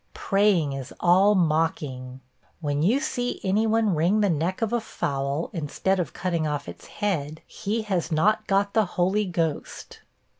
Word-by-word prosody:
Praying 195 Hz, -8 st, +2 dB
is 135 Hz, -1 st, -6 dB
all 190 Hz, +4 st, +5 dB
mocking. 150 Hz, -7 st, -1 dB, 0.4 s
When 145 Hz, -3 st, -1 dB
you 220 Hz, -, +3 dB
see 250 Hz, -5 st, -2 dB
any 205 Hz, +4 st, +2 dB
one 220 Hz, -2 st, +2 dB
wring 175 Hz, +7 st, +2 dB
the 200 Hz, -3 st, +3 dB
neck 170 Hz, +7 st, -1 dB
of 225 Hz, -, -1 dB
a 240 Hz, -, +1 dB
fowl, 140 Hz, -6 st, -3 dB
instead 185 Hz, +3 st, -1 dB
of 175 Hz, -, -2 dB
cutting 170 Hz, -3 st, -1 dB
off 145 Hz, -1 st, -3 dB
its 85 Hz, 0 st, -10 dB
head, 160 Hz, -7 st, -3 dB
he 220 Hz, +3 st, -3 dB
has 185 Hz, -5 st, -2 dB
not 215 Hz, +7 st, +2 dB
got 200 Hz, +1 st, +1 dB
the 220 Hz, -1 st, +3 dB
Holy 190 Hz, +4 st, +2 dB
Ghost. 165 Hz, -4 st, -3 dB
180 Hz, 160 wpm, -25 LUFS, 155-205 Hz, 0.4 s, all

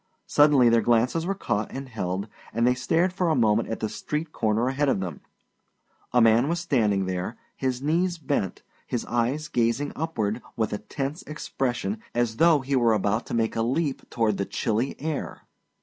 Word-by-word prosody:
Suddenly 145 Hz, -5 st, +5 dB
their 115 Hz, 0 st, +4 dB
glances 120 Hz, +9 st, +2 dB
were 195 Hz, -, 0 dB
caught 105 Hz, -, -2 dB
and 135 Hz, 0 st, -6 dB
held, 100 Hz, -4 st, -3 dB, 0.3 s
and 115 Hz, +1 st, +2 dB
they 125 Hz, -, +5 dB
stared 165 Hz, +8 st, +1 dB
for 180 Hz, -2 st, 0 dB
a 160 Hz, -, +3 dB
moment 115 Hz, -2 st, +2 dB
at 115 Hz, -, -4 dB
the 110 Hz, -, 0 dB
street 150 Hz, +9 st, -4 dB
corner 110 Hz, 0 st, +1 dB
ahead 135 Hz, +2 st, +1 dB
of 115 Hz, -, +1 dB
them. 90 Hz, -6 st, -5 dB, 0.9 s
A 125 Hz, -, +4 dB
man 115 Hz, +3 st, +5 dB
was 170 Hz, +1 st, 0 dB
standing 105 Hz, -, +1 dB
there, 95 Hz, +5 st, -3 dB, 0.2 s
his 130 Hz, -1 st, -2 dB
knees 170 Hz, +4 st, +1 dB
bent, 140 Hz, -, -2 dB, 0.2 s
his 120 Hz, -, -2 dB
eyes 125 Hz, +6 st, 0 dB
gazing 125 Hz, 0 st, 0 dB
upward 115 Hz, -8 st, -2 dB
with 110 Hz, -2 st, -1 dB
a 105 Hz, -, -2 dB
tense 135 Hz, +8 st, -4 dB
expression 150 Hz, -, -2 dB, 0.2 s
as 120 Hz, -2 st, 0 dB
though 165 Hz, -3 st, +5 dB
he 135 Hz, +1 st, -1 dB
were 120 Hz, -3 st, +4 dB
about 105 Hz, +2 st, 0 dB
to -, -, -3 dB
make 115 Hz, -1 st, 0 dB
a 115 Hz, -, +1 dB
leap 135 Hz, +5 st, -1 dB
toward 110 Hz, -4 st, +1 dB
the 100 Hz, -, -1 dB
chilly 115 Hz, +4 st, -1 dB
sky. 155 Hz, 0 st, -3 dB
125 Hz, 185 wpm, -26 LUFS, 110-150 Hz, 0.9 s, Suddenly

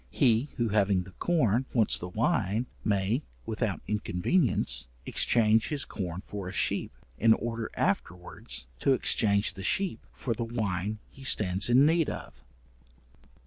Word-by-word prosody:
He 125 Hz, 0 st, +2 dB
who 120 Hz, -2 st, 0 dB
having 100 Hz, -3 st, +2 dB
the 95 Hz, -, -13 dB
corn, 130 Hz, -, +1 dB
wants 115 Hz, -3 st, +4 dB
the 90 Hz, -, -5 dB
wine, 110 Hz, -, 0 dB, 0.2 s
may, 105 Hz, +5 st, +1 dB, 0.2 s
without -, -, -2 dB
inconvenience, 105 Hz, -, +1 dB, 0.2 s
exchange 110 Hz, -1 st, +3 dB
his 145 Hz, -2 st, -1 dB
corn 90 Hz, -1 st, -5 dB
for 100 Hz, -3 st, -6 dB
a -, -, -6 dB
sheep, 95 Hz, -, 0 dB, 0.3 s
in 115 Hz, 0 st, +6 dB
order 115 Hz, -1 st, -4 dB
afterwards 90 Hz, -6 st, -2 dB
to 135 Hz, -, +3 dB
exchange 100 Hz, -5 st, +2 dB
the 95 Hz, -, -8 dB
sheep 190 Hz, -, -1 dB
for 120 Hz, -, -3 dB
the 115 Hz, +1 st, -3 dB
wine 105 Hz, -3 st, -2 dB
he 135 Hz, -, -14 dB
stands 100 Hz, -5 st, +1 dB
in 130 Hz, +4 st, +6 dB
need 165 Hz, 0 st, +3 dB
of. -, -, -8 dB
110 Hz, 145 wpm, -29 LUFS, 100-125 Hz, 0.3 s, in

